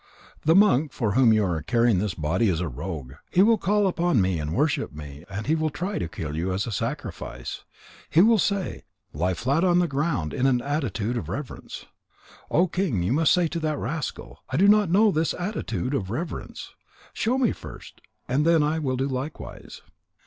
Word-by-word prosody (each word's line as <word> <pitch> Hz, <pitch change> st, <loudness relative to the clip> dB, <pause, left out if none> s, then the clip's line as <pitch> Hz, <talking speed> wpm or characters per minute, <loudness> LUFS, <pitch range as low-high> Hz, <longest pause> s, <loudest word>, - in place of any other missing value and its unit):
The 160 Hz, +2 st, +5 dB
monk 160 Hz, -8 st, +4 dB
for 110 Hz, -4 st, -1 dB
whom 125 Hz, 0 st, +5 dB
you 110 Hz, -2 st, +3 dB
are 85 Hz, -4 st, -1 dB
carrying 115 Hz, +5 st, +2 dB
this 100 Hz, -3 st, -2 dB
body, 90 Hz, +8 st, +1 dB
is 85 Hz, -3 st, 0 dB
a 90 Hz, -, -1 dB
rogue. 75 Hz, -1 st, -6 dB, 0.2 s
He 185 Hz, -, +4 dB
will 225 Hz, 0 st, +4 dB
call 205 Hz, +3 st, +2 dB
upon 175 Hz, -, +2 dB
me 95 Hz, -3 st, +1 dB
and 75 Hz, 0 st, -3 dB
worship 150 Hz, +2 st, 0 dB
me, 75 Hz, +1 st, -10 dB
and 100 Hz, +2 st, -5 dB
he 155 Hz, -, +2 dB
will 155 Hz, -1 st, +1 dB
try 180 Hz, +7 st, -3 dB
to -, -, -2 dB
kill 75 Hz, -2 st, -5 dB
you 85 Hz, +4 st, -1 dB
as 95 Hz, +2 st, -1 dB
a 115 Hz, -, -5 dB
sacrifice. 100 Hz, -, -5 dB, 0.4 s
He 160 Hz, -, +3 dB
will 225 Hz, +2 st, +5 dB
say: 200 Hz, -1 st, -1 dB, 0.3 s
Lie 90 Hz, +5 st, 0 dB
flat 140 Hz, -, 0 dB
on 175 Hz, -1 st, +4 dB
the 175 Hz, -1 st, +3 dB
ground 140 Hz, -, -1 dB
in 130 Hz, -, +1 dB
an 125 Hz, -2 st, +3 dB
attitude 125 Hz, -5 st, -2 dB
of 80 Hz, -9 st, -5 dB
reverence.' 130 Hz, +7 st, -7 dB, 0.6 s
O 175 Hz, +4 st, +3 dB
King, 170 Hz, -, -1 dB
you 95 Hz, -, +1 dB
must 155 Hz, +1 st, +3 dB
say 175 Hz, -2 st, +3 dB
to 170 Hz, -, -3 dB
that 155 Hz, -2 st, -1 dB
rascal: 150 Hz, +3 st, -5 dB
I 130 Hz, -, -1 dB
do 195 Hz, +4 st, +5 dB
not 210 Hz, -3 st, +5 dB
know 205 Hz, +4 st, +4 dB
this 160 Hz, -1 st, 0 dB
attitude 145 Hz, -, -3 dB
of 100 Hz, -9 st, -2 dB
reverence. 155 Hz, -, -5 dB, 0.4 s
Show 245 Hz, +4 st, 0 dB
me 255 Hz, -4 st, +2 dB
first, -, -, -11 dB, 0.3 s
and 135 Hz, +4 st, +1 dB
then 165 Hz, -1 st, +4 dB
I 155 Hz, +2 st, 0 dB
will 130 Hz, -4 st, -1 dB
do 135 Hz, +2 st, 0 dB
likewise.' 135 Hz, +3 st, -6 dB
135 Hz, 200 wpm, -25 LUFS, -, 0.6 s, The